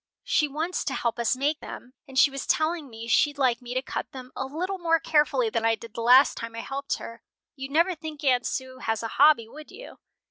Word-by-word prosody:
"She 485 -11 +2
wants 315 +5 -3
to - - -2
help 235 0 -2
us 235 +1 +2
make 290 +4 0
them, 250 - -10
and 265 -1 -9
she 285 0 +6
was 275 0 -6
telling 315 -2 0
me 225 0 -9
she'd 290 +5 +2
like 255 -3 +1
me 245 0 -7
to 255 - 0
cut - - -5
them 255 -1 -9
a 265 - -3
little 365 +7 -4
more 330 -1 +2
carefully 320 +10 +2
than 225 - -1
I 225 0 +3
did 225 0 -12
the 235 - -5
last 250 +4 +6
time 230 0 -6
I 230 - -4
helped 275 +2 -3
her. 230 0 -10 0.3
You'd 270 -1 -7
never 335 +6 +2
think 310 -2 -8
Aunt 250 -3 +2
Sue 260 -1 -5
has 225 -2 -2
a - - -1
hobby, 285 -6 +6
would 300 +6 -12
you?" 465 +6 -12
275 Hz, 240 wpm, -26 LUFS, 245-310 Hz, 0.3 s, she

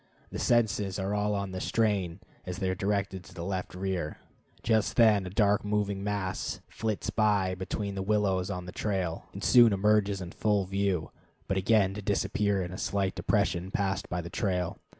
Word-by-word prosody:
The - - -4
senses 105 -5 +1
are 95 +1 -2
all 105 0 +1
on 100 -1 -3
the 95 0 -4
strain 100 -5 0 0.2
as 90 -1 -5
they 95 - -1
are - - 0
directed 100 -1 -1
to - - -14
the 85 - -5
left 95 -1 -3
rear. 90 -4 -2 0.5
Just 110 -2 +2
then 105 -5 +5
a - - -4
dark 105 +2 +2
moving 105 -1 -1
mass 100 -3 -2
flits 110 -2 -3
by 100 -4 +2
between 100 +2 -3
the 95 - -3
willows 95 -2 +1
on 90 -2 -4
the 90 - -7
trail, 95 -6 -2
and - - -8
soon 120 -2 +7
emerges 100 0 +2
in 90 -2 -6
full 105 -2 +1
view, 95 -3 -1 0.4
but 95 - 0
again 95 0 +3
to 105 - -6
disappear 100 0 0
in 90 - -6
a 95 - -7
slight 100 -2 0
depression 90 +2 0
passed 95 -1 -1
by 90 0 -2
the 85 - -8
trail. 90 -5 -1
100 Hz, 190 wpm, -29 LUFS, 95-105 Hz, 0.5 s, soon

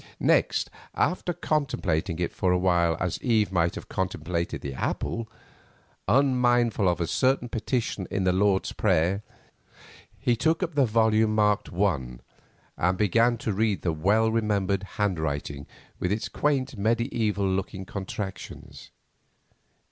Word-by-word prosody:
Next, - - +2 0.2
after 180 +2 0
contemplating 100 - -1
it 85 -1 -2
for 95 - +1
a 90 - +3
while 85 -3 +2
as 90 -2 -2
Eve 110 -5 +2
might 85 -2 +1
have - - -8
contemplated 85 -2 -3
the 70 - -5
apple, 110 - -3 0.8
unmindful 120 -6 +3
of 90 - -1
a 85 - 0
certain 130 +7 +1
petition 115 -4 -2
in 95 - -1
the 90 -1 +2
Lord's 95 0 +2
Prayer, 95 0 +1 1.0
he 125 -3 +1
took 160 - +1
up 170 -2 -3
the 140 -3 +3
volume 110 -1 +3
marked 105 -1 +2
I, 80 -10 -1 0.6
and 90 +2 +1
began 115 +4 +3
to 110 -2 -2
read 105 -1 0
the 85 - +1
well 105 +8 +2
remembered 100 -4 0 0.2
hand 100 -5 0
writing 70 -2 -3 0.3
with 90 - -1
its 110 +2 -2
quaint 135 -3 0
mediaeval 110 -2 0
looking 95 0 -2
contractions. 95 0 -7
100 Hz, 135 wpm, -26 LUFS, 90-115 Hz, 1.0 s, a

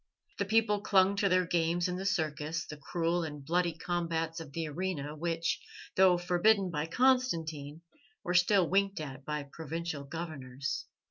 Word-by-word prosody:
The 200 - +1
people 210 0 +2
clung 195 -1 +4
to 200 0 +3
their 185 0 +3
games 170 0 +1
in 180 - -2
the 190 +1 -2
circus, 160 -3 -1
the 150 - -7
cruel 165 +4 -1
and 150 -3 -6
bloody 175 +2 +1
combats 165 -1 -2
of 160 -4 -9
the 165 +2 -3
arena, 150 -2 -3
which, 165 +1 -1 0.4
though 185 -1 +6
forbidden 180 +2 +3
by 150 0 -2
Constantine, 165 - +1 0.4
were 180 - -1
still 180 +1 +4
winked 195 +1 +1
at 135 -3 -7
by 150 -1 -2
provincial 160 +1 -5
governors. 140 -4 -5
170 Hz, 155 wpm, -31 LUFS, 155-185 Hz, 0.4 s, though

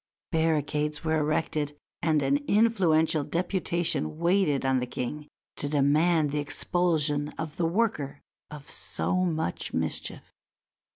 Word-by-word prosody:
Barricades 150 -2 0
were 160 -1 +1
erected 150 -1 -1 0.2
and 155 -3 +2
an 135 +1 +3
influential 175 -8 +3
deputation 170 - -1
waited 170 -5 +2
on 130 -1 +3
the 125 - -3
King 145 +5 -5 0.3
to 145 - 0
demand 150 +2 +3
the 150 - -1
expulsion 150 -1 0
of 160 -1 -5
the 170 - +1
worker 165 -8 -1 0.3
of 150 -2 -10
so 185 - -2
much 165 - -1
mischief. - - -3
155 Hz, 120 wpm, -27 LUFS, 145-170 Hz, 0.3 s, an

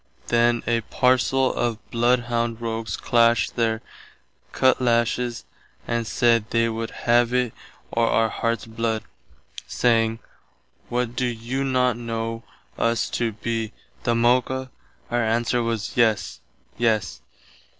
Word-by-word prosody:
Then 120 0 +3
a 115 -1 +1
parcell 130 +3 +2
of 120 -2 -1
bloodhound 120 -1 +1
rogues 115 -1 -3
clasht 115 0 +3
their 115 -1 0 0.7
cutlashes 120 -1 +1 0.4
and 115 -1 -1
said 115 -3 +2
they 115 0 +2
would 115 0 -3 0.2
have 120 +1 +3
itt 125 -3 +1 0.4
or 115 0 +2
our 115 0 +2
hearts 115 +1 -2
blood, 115 -1 -2 0.6
saying, 115 -2 +2 0.7
"What 120 0 -1
doe 130 - 0
you 120 +3 -2
not 125 -3 +1
know 115 -1 -4 0.4
us 115 -1 +1
to 115 -2 -1
be 115 +1 -3 0.3
the 120 -2 +1
Moca?" 130 +2 +1 0.4
Our 120 -1 +1
answer 120 +2 +1
was 115 -2 -3
Yes, 115 -3 +1 0.4
Yes. 110 - 0
115 Hz, 120 wpm, -23 LUFS, 115-120 Hz, 0.7 s, Then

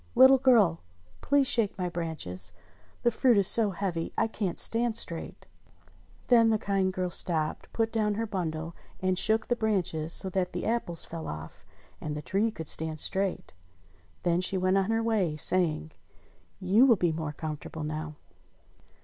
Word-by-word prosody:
Little 265 +1 +7
girl! 225 -11 +3 0.4
Please 285 0 +2
shake 230 -7 0
my 180 -1 -2
branches. 155 - +1 0.5
The 240 - +3
fruit 240 0 +3
is 195 -2 +3
so 225 -3 +4
heavy 175 -3 -3
I - - +2
can't 210 -5 -4
stand 230 0 +3
straight 170 -6 -4 0.4
!" - - -30
Then 230 -2 +5
the 220 - +2
kind 195 -2 -1
girl 185 -1 -3
stopped, 160 -3 0
put 225 -1 -1
down 210 -2 0
her 225 +2 -2
bundle, 165 -5 -4 0.2
and 185 0 0
shook 220 +4 +1
the 240 - +1
branches 180 -8 -1
so 190 - +2
that 180 -1 -2
the - - -4
apples 220 -8 -3
fell 165 -1 -7
off, 75 +1 -8 0.4
and 150 -1 -4
the 150 - -7
tree 200 +7 0
could 165 -8 -8
stand 160 0 +1
straight. 195 +3 -2 0.7
Then 175 0 +1
she 190 +1 -1
went 185 +1 +2
on 195 +2 -1
her 225 0 0
way, 205 -9 0
saying: 155 - +1 0.7
"You 205 +8 +4
will 235 - +6
be 175 -4 0
more 155 -1 -4
comfortable 155 +1 -6
now." 155 0 -5
185 Hz, 170 wpm, -28 LUFS, 160-220 Hz, 0.7 s, Little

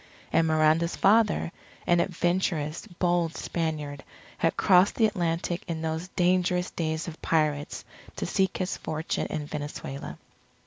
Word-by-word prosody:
And 165 - +4
Miranda's 155 +2 +3
father, 210 -3 +3 0.3
an 175 0 +4
adventurous, 175 -2 0
bold 175 -3 0
Spaniard, 150 -4 -3 0.4
had 165 - +1
crossed 185 +1 +5
the 225 - +4
Atlantic 175 -3 -1
in 165 -2 -3
those 160 +2 -2
dangerous 180 0 +2
days 160 -1 -2
of 165 -1 -8
pirates 150 -3 0 0.3
to - - -3
seek 190 -2 +1
his 185 0 -2
fortune 155 +1 -2
in 150 - -4
Venezuela. 145 -2 -6
165 Hz, 130 wpm, -27 LUFS, 155-180 Hz, 0.4 s, crossed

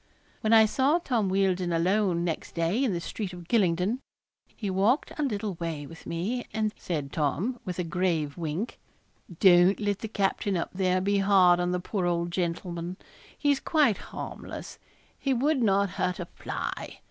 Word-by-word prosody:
When 215 - 0
I 220 -1 +8
saw 270 +8 +2
Tom 240 - 0
Wealdon 185 -2 +1
alone 180 +1 +2
next 165 -2 -3
day 170 +10 +1
in 255 - +2
the 175 - -1
street 185 +2 -5
of 175 -2 -10
Gylingden, 195 +1 +2 0.6
he 210 - -4
walked 200 +9 +2
a - - -3
little 210 -7 -1
way 160 -4 -3
with 165 +3 -12
me, 205 +9 -2
and, 215 -1 -1
said 150 -6 -4
Tom, 175 - -1
with 180 -1 -4
a 180 - 0
grave 165 -3 -1
wink 170 +6 -4 0.6
'Don't 180 0 +6
let 205 -1 -1
the 220 - -4
captain 200 -2 0
up 170 - -3
there 185 -1 +1
be 200 +1 +2
hard 190 -3 +5
on 175 0 0
the 180 - 0
poor 180 0 -2
old 170 0 0
gentleman. 175 0 -3 0.4
He's 285 -2 +2
quite 290 - +3
harmless - - -7 0.4
he 270 -2 +1
would 275 +2 +2
not 200 -3 +3
hurt 180 -1 0
a 175 - -3
fly. - - -5
190 Hz, 170 wpm, -28 LUFS, 175-215 Hz, 0.6 s, I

